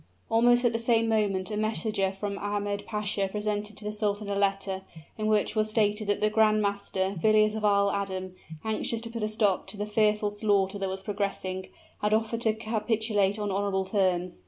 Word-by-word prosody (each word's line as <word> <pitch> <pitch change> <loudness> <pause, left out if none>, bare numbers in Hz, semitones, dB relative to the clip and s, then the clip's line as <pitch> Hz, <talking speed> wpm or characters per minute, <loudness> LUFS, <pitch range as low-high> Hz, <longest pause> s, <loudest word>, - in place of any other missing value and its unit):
Almost 240 +2 +4
at 235 - +3
the 230 - 0
same 230 -1 +3
moment 205 -3 0
a 210 - -2
messenger 215 -2 0
from 200 +1 -4
Ahmed 205 0 -2
Pasha 210 -2 -1
presented 210 +1 -3
to 210 - -4
the 210 - -3
sultan 210 -1 -2
a - - 0
letter, 195 -1 0 0.3
in 215 0 -2
which 215 0 +1
was 215 0 +1
stated 210 -1 +1
that 205 - 0
the 215 - +3
grand 215 -1 +4
master, 200 -2 -1
Villiers 215 +1 +4
of 220 -1 -4
Isle 200 -1 +3
Adam, 190 -2 -3 0.3
anxious 220 +1 -1
to 230 0 -6
put 230 -1 -5
a 215 - 0
stop 210 -3 +1
to 210 - -7
the 205 - -2
fearful 210 0 +2
slaughter 205 -2 +1
that 195 -1 -1
was 190 0 -5
progressing, 195 -2 -3 0.3
had 210 +1 +3
offered 225 +1 -1
to 220 -2 +2
capitulate 220 -2 0
on 205 -1 -2
honorable 195 -1 0
terms. 185 - 0
210 Hz, 195 wpm, -28 LUFS, 200-215 Hz, 0.3 s, Almost